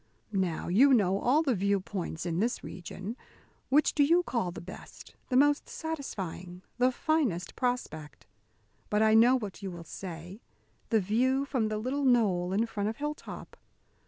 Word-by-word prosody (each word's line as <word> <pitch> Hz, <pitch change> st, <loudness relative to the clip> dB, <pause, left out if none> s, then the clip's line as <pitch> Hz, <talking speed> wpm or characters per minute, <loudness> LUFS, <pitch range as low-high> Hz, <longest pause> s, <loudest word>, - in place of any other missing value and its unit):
Now, 185 Hz, -4 st, -1 dB
you 255 Hz, +10 st, +6 dB
know 195 Hz, -3 st, +2 dB
all 285 Hz, +9 st, +3 dB
the 275 Hz, -5 st, +2 dB
view 200 Hz, 0 st, +1 dB
points 180 Hz, -4 st, -5 dB
in 170 Hz, 0 st, -1 dB
this 235 Hz, +4 st, -1 dB
region. 190 Hz, +5 st, -7 dB, 0.5 s
Which 295 Hz, +3 st, +4 dB
do 290 Hz, -, +4 dB
you 340 Hz, +5 st, +4 dB
call 235 Hz, -, -1 dB
the 175 Hz, -, -7 dB
best, 185 Hz, +2 st, -11 dB, 0.2 s
the 255 Hz, -, +2 dB
most 290 Hz, +2 st, +3 dB
satisfying, 190 Hz, -, -6 dB, 0.2 s
the 250 Hz, +1 st, +4 dB
finest 255 Hz, -, -1 dB
prospect? 160 Hz, -, -3 dB, 0.6 s
But 210 Hz, +1 st, +2 dB
I 220 Hz, 0 st, +4 dB
know 240 Hz, +4 st, +6 dB
what 210 Hz, -6 st, -7 dB
you 195 Hz, -, -4 dB
will 170 Hz, -2 st, -8 dB
say: 175 Hz, +3 st, -8 dB, 0.5 s
the 225 Hz, -3 st, +3 dB
view 255 Hz, +8 st, +1 dB
from 255 Hz, -6 st, 0 dB
the 215 Hz, 0 st, -2 dB
little 260 Hz, +6 st, -2 dB
knoll 205 Hz, -9 st, +3 dB
in 210 Hz, +4 st, +2 dB
front 210 Hz, -2 st, -2 dB
of 220 Hz, -, -5 dB
Hilltop. 295 Hz, +1 st, -6 dB
215 Hz, 165 wpm, -29 LUFS, 185-260 Hz, 0.6 s, you